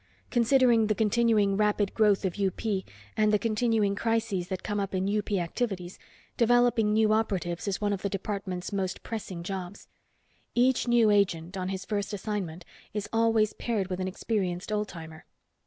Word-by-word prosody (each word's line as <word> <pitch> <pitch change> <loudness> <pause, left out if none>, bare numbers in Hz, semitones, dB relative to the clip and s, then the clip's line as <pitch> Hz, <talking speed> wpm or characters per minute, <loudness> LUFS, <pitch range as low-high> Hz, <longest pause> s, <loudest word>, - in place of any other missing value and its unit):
Considering 240 -2 +4
the 215 - +1
continuing 215 -2 +2
rapid 210 -1 +1
growth 210 -3 +3
of 190 +1 -3
UP, 195 -2 0 0.6
and 215 -1 +3
the 210 - +4
continuing 220 -2 +1
crises 225 -4 -1
that 190 0 -4
come 205 -1 -2
up 195 -1 -2
in 185 +1 0
UP 210 0 -2
activities, 185 0 -2 0.4
developing 240 -2 +3
new 215 0 +3
operatives 190 -5 -1
is 195 - -1
one 205 -1 0
of 195 - -4
the 200 - -1
department's 195 -1 -4
most 190 -2 -2
pressing 195 -6 -5
jobs. 190 +1 -6 0.7
Each 250 +1 +3
new 235 -3 +4
agent, 180 -3 +1
on 185 -1 -3
his 190 -1 -4
first 205 0 -2
assignment, 190 -5 -4 0.3
is 210 -1 -2
always 225 -2 +3
paired 210 -6 -2
with 180 - -2
an 185 - -1
experienced 190 -1 -2
old 210 0 0
timer." 160 -3 -10
205 Hz, 165 wpm, -28 LUFS, 190-220 Hz, 0.7 s, Considering